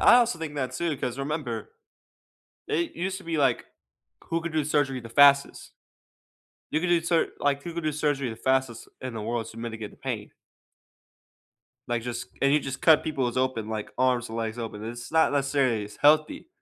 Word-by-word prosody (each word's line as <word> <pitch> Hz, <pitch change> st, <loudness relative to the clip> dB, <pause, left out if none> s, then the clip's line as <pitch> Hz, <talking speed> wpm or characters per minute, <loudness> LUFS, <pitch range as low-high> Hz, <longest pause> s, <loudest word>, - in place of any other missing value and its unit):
I -, -, +8 dB
also 240 Hz, -7 st, +3 dB
think 160 Hz, -2 st, -5 dB
that 130 Hz, -3 st, -2 dB
too 170 Hz, -3 st, -1 dB
'cause 125 Hz, 0 st, -3 dB
remember, 140 Hz, -, -3 dB, 0.9 s
it 340 Hz, -1 st, -1 dB
used 190 Hz, +2 st, -2 dB
to 190 Hz, -, -14 dB
be 165 Hz, -1 st, -2 dB
like, 135 Hz, -5 st, +2 dB, 0.6 s
who 165 Hz, 0 st, -1 dB
could 170 Hz, -1 st, -5 dB
do 155 Hz, -1 st, +1 dB
surgery 140 Hz, -3 st, +1 dB
the 115 Hz, -, -10 dB
fastest? 140 Hz, +2 st, +5 dB, 1.0 s
You 155 Hz, -, +2 dB
could 180 Hz, -, -1 dB
do 175 Hz, -1 st, +4 dB
sur 170 Hz, 0 st, +1 dB
like, 140 Hz, 0 st, +1 dB
who 170 Hz, -, -6 dB
could 170 Hz, 0 st, -4 dB
do 155 Hz, -, +1 dB
surgery 145 Hz, -3 st, 0 dB
the 110 Hz, -, -6 dB
fastest 130 Hz, -3 st, 0 dB
in 130 Hz, -2 st, -5 dB
the 110 Hz, -, -5 dB
world 115 Hz, +1 st, -2 dB
to 115 Hz, -, -11 dB
mitigate 110 Hz, -2 st, -6 dB
the -, -, -18 dB
pain? -, -, -4 dB, 1.6 s
Like, 120 Hz, -1 st, -1 dB
just 120 Hz, 0 st, -4 dB, 0.2 s
and 140 Hz, 0 st, +4 dB
you 150 Hz, -, +4 dB
just 135 Hz, -2 st, -6 dB
cut 160 Hz, -2 st, +6 dB
peoples 130 Hz, -6 st, -2 dB
open 130 Hz, -4 st, 0 dB
like, 110 Hz, -1 st, -4 dB
arms 125 Hz, -2 st, +2 dB
and 110 Hz, -, -6 dB
legs 115 Hz, 0 st, -3 dB
open, 110 Hz, -2 st, -5 dB
it's 120 Hz, +1 st, -7 dB
not, 160 Hz, -2 st, +4 dB
necessarily 135 Hz, -6 st, +1 dB
as 105 Hz, 0 st, -11 dB
healthy. 155 Hz, -, +3 dB
135 Hz, 195 wpm, -27 LUFS, 120-155 Hz, 1.6 s, I